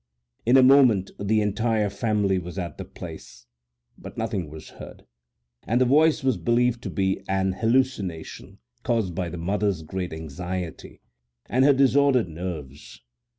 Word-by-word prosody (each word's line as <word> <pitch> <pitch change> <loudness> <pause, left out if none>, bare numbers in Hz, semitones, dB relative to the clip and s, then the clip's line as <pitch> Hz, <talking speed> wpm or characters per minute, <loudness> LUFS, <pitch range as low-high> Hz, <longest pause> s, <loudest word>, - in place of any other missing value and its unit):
In 125 +3 +6
a 130 - +7
moment 125 -8 +5
the 105 +2 +1
entire 105 0 0
family 100 -2 0
was 90 +1 -8
at 85 -4 -5
the - - -5
place, - - -11 0.5
but - - -10
nothing 105 -8 -3
was 80 +1 -11
heard, - - -12 0.6
and 120 +3 +2
the 130 - +4
voice 150 +3 +3
was 130 -5 +1
believed 120 +6 +1
to - - -5
be 95 -1 -1
an 95 0 +1
hallucination 115 -7 -1 0.2
caused 115 -6 -1
by 90 0 -3
the 85 - -7
motherŌĆÖs 95 -1 -1
great 90 +2 -4
anxiety 85 +3 -6 0.4
and 130 +2 +2
her 145 - +6
disordered 135 -4 +3
nerves. 75 -8 -8
100 Hz, 150 wpm, -25 LUFS, 90-120 Hz, 0.6 s, a